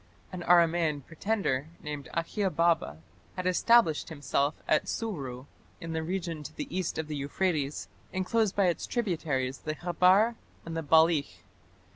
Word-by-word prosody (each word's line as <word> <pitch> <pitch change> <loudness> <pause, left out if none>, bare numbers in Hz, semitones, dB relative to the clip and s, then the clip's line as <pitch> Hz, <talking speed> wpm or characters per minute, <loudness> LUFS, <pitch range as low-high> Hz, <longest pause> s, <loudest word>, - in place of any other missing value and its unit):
An 185 -2 -6
Aramaean 165 -5 +3
pretender 165 -6 -1
named 150 -2 -6
Akhiababa 170 - +1 0.4
had 185 - -4
established 185 -2 +3
himself 145 -1 0
at 155 - +2
Suru 140 - -4 0.3
in 165 0 -6
the 160 - -1
region 170 -2 -3
to 150 - -9
the 295 - -3
east 185 -3 -2
of 160 -1 -3
the 155 - -4
Euphrates, 145 0 -1 0.2
enclosed 195 +2 0
by 200 - +3
its 175 -2 0
tributaries 155 - -1
the 155 0 -4
Khabar 185 +7 +3 0.3
and 165 0 -5
the 165 - -1
Balikh. 155 - +3
165 Hz, 140 wpm, -29 LUFS, 150-185 Hz, 0.4 s, Aramaean